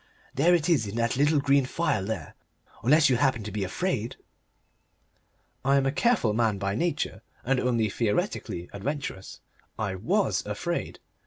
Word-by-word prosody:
"There 170 +6 +4
it 165 -2 0
is 145 - +2
in 100 - -6
that 115 +1 0
little 145 +3 +3
green 140 -1 +3
phial 130 - 0
there! 110 +2 -4 0.5
Unless 150 +6 +5
you 125 - +3
happen 130 -4 +1
to 105 - -6
be 105 -1 -2
afraid?" 120 - -2 1.5
I 135 +1 +3
am 135 -1 +3
a 135 - +2
careful 185 - +2
man 110 -2 +1
by 100 0 -2
nature, 170 +10 -1 0.2
and 135 +1 +1
only 120 -4 +1
theoretically 105 -5 -2
adventurous. 105 -2 -5 0.4
I 105 -3 -2
WAS 95 - 0
afraid. - - -3
125 Hz, 155 wpm, -27 LUFS, 105-145 Hz, 1.5 s, Unless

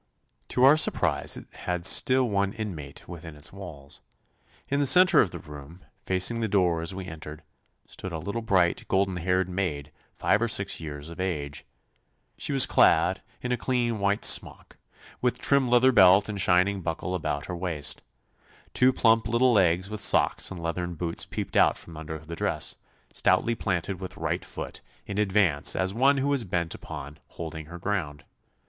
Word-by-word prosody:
To 125 - 0
our 140 +4 +7
surprise - - +1
it - - -10
had 90 -1 -4
still 130 +5 +4
one 100 -2 0
inmate 85 -11 -7
within 85 -2 -9
its 75 +4 -7
walls. 80 -8 -10 0.7
In 140 - 0
the 145 - +3
centre 185 +5 +6
of 95 - 0
the - - -8
room, 75 +3 -12 0.3
facing 95 +5 0
the 115 - -1
door 90 -5 +1
as 85 +3 -5
we 95 -1 -6
entered, 80 -2 -9 0.4
stood 95 - -8
a 80 - -4
little 100 +9 -4
bright, 95 -6 +1
golden 95 -1 0
haired 90 +1 0
maid, 85 -6 -3 0.2
five 105 - +1
or 120 - +1
six 100 -3 -1
years 75 -1 -8
of 85 - -11
age. 75 -7 -4 0.7
She - - -3
was 135 -2 +7
clad 90 +4 +3 0.2
in 125 - -3
a 125 - +1
clean 120 -2 -1
white 100 +1 +1
smock, - - +1 0.4
with 125 -1 0
trim 140 -3 +2
leather 125 +2 +5
belt 95 -3 +6
and 100 -2 -3
shining 95 +2 +2
buckle 85 +2 -4
about 75 -4 -3
her 90 - -5
waist. 85 -5 -2 0.7
Two 125 +1 +4
plump 115 -3 +2
little 120 +2 +3
legs 95 -1 +2
with 105 - -5
socks - - +3
and 95 - -8
leathern 85 +1 -4
boots 85 +1 -3
peeped - - -6
out - - +4
from 85 - -12
under 80 0 -7
the 80 +2 -9
dress, - - -1 0.4
stoutly 115 - +2
planted 95 -4 -3
with 95 -1 -8
right - - -2
foot - - -7 0.2
in 100 0 -4
advance 95 -8 +2
as 95 +1 -1
one 135 +5 +3
who 135 +1 0
was 140 -4 0
bent 85 -4 -2
upon 75 +2 -9
holding 80 -2 -8
her 85 +2 -9
ground. 85 -6 -3
95 Hz, 180 wpm, -26 LUFS, 80-110 Hz, 0.7 s, our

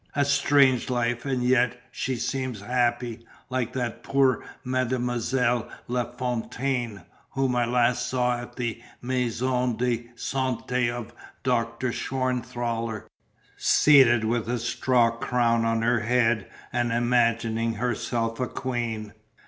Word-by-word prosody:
"A 145 -1 +3
strange 140 -3 +3
life, 120 +1 -1
and 130 -2 0
yet 125 -1 +2
she 130 - -2
seems 125 -2 -3
happy, 120 0 -1 0.3
like 130 -2 -1
that 120 -3 -3
poor 135 -3 +2 0.2
Mademoiselle 125 -1 0 0.2
La 125 0 0
Fontaine, 125 -2 -2 0.3
whom 135 -2 0
I 120 -1 +2
last 120 0 +2
saw 125 -1 +1
at 120 - -10
the 120 -2 -3 0.2
Maison 125 -1 0
de 120 -1 -1
Santé 125 -1 -1
of 120 -1 -6 0.3
Doctor 120 0 0
Schwanthaller, 120 -4 -2 0.5
seated 130 -6 +5
with 115 0 -1
a 125 - 0
straw 120 0 +2
crown 115 0 +1
on 115 0 +1
her 120 0 +3
head 120 0 +1 0.2
and 120 -1 +1
imagining 115 -1 +1
herself 115 0 -2
a 125 - 0
queen." 115 -4 -3
120 Hz, 120 wpm, -26 LUFS, 115-125 Hz, 0.5 s, seated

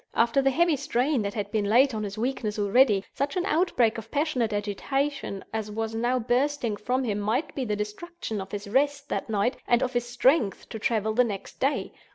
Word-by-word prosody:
After 235 +4 +3
the 270 - +3
heavy 330 +2 +2
strain 270 -1 0
that 200 -1 -3
had 205 -2 -3
been 215 -2 0
laid 255 +4 +5
on 215 - -2
his 205 0 -5
weakness 225 -3 -2
already, 205 0 +4
such 285 +7 -2
an 360 - 0
outbreak 280 - +2
of 225 0 -11
passionate 280 -6 0
agitation 210 +3 -2
as 220 -1 -2
was 220 +1 -3
now 240 +3 +1
bursting 250 -1 0
from 250 +6 -1
him 210 -4 -1
might 235 +9 -1
be 265 - -2
the 210 -2 -1
destruction 210 - -5
of 190 - -9
his 205 0 -5
rest 285 +5 +1
that - - -3
night 215 +3 +1
and 240 +1 +3
of 255 - -2
his 240 0 -1
strength 245 -3 +2
to 220 - -6
travel 220 -1 0
the 250 +3 +4
next 205 -5 -6
day. 275 +2 0
235 Hz, 205 wpm, -27 LUFS, 210-275 Hz, -, laid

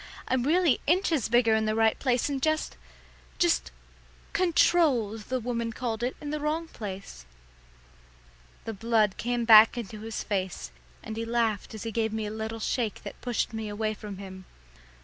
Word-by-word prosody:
I'm 260 -1 +1
really 315 +1 +3
inches 325 - +2
bigger 235 -1 +4
in 220 0 +2
the 215 0 0
right 225 0 +2
place, 250 -2 +1
and 275 -2 -2
just 310 +2 0 0.6
just - - +2 0.6
'controlled,' 275 - +2
the 255 0 0
woman 235 -1 -2
called 225 -2 -3
it, 245 +2 -1
in 295 -1 -5
the 305 - -2
wrong 310 +3 -1
place." 195 - -8 1.4
The 225 - -4
blood 215 -1 +1
came 240 0 -1
back 220 +1 +8
into 215 -2 -6
his 225 0 -4
face, 185 - -3 0.3
and 220 - -6
he 225 - -2
laughed 230 -3 -1
as 215 - -7
he 225 - -4
gave 220 0 -1
me 220 -1 -2
a 210 - -4
little 220 +1 -4
shake 225 -1 -2
that - - -9
pushed 245 -1 -1
me 220 -1 -4
away 215 +1 -2
from 205 -2 -8
him. 190 -1 -9
225 Hz, 170 wpm, -28 LUFS, 215-250 Hz, 1.4 s, back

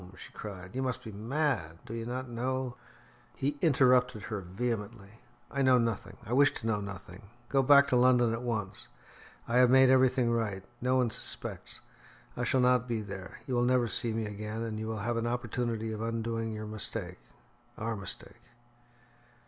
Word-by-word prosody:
she - - -10
cried. 95 -3 -8
"You 130 - -1
must 130 -2 -2
be 110 - -7
mad. 110 - -1
Do 115 - -7
you 115 0 -4
not 130 +1 -3
know 125 +1 -2 0.3
" - - -29
He 145 +2 -2
interrupted 125 - +4
her 105 -2 -4
vehemently. 105 +2 -4 0.3
"I 140 - -1
know 130 -1 +6
nothing. 115 -3 -2
I 115 - -3
wish 140 +1 +6
to - - -6
know 110 -2 +1
nothing. 95 -1 -9 0.2
Go 135 - +3
back 140 +1 +7
to 130 - +2
London 125 -2 +5
at 115 - -3
once. 105 - -3 0.6
I 120 - +1
have 125 -1 +6
made 130 0 +7
everything 130 -2 +4
right; 105 -5 -1 0.2
no 125 +1 +2
one 125 -3 +2
suspects. - - -5 0.5
I - - -2
shall 130 - +2
not 125 -1 +3
be 115 -3 -2
there; 95 -2 -8
you 130 - -3
will 120 - +2
never 125 -1 +3
see 115 +1 -2
me 110 0 -1
again, 105 +2 -5
and 110 -2 -4
you 110 - -4
will 110 0 -3
have 120 0 0
an 115 0 -1
opportunity 120 -2 -2
of 110 0 -4
undoing 115 0 -2
your 110 0 -5
mistake 105 - -4 0.6
our 115 +1 -2
mistake." 100 +3 -6
115 Hz, 185 wpm, -30 LUFS, 110-125 Hz, 0.6 s, back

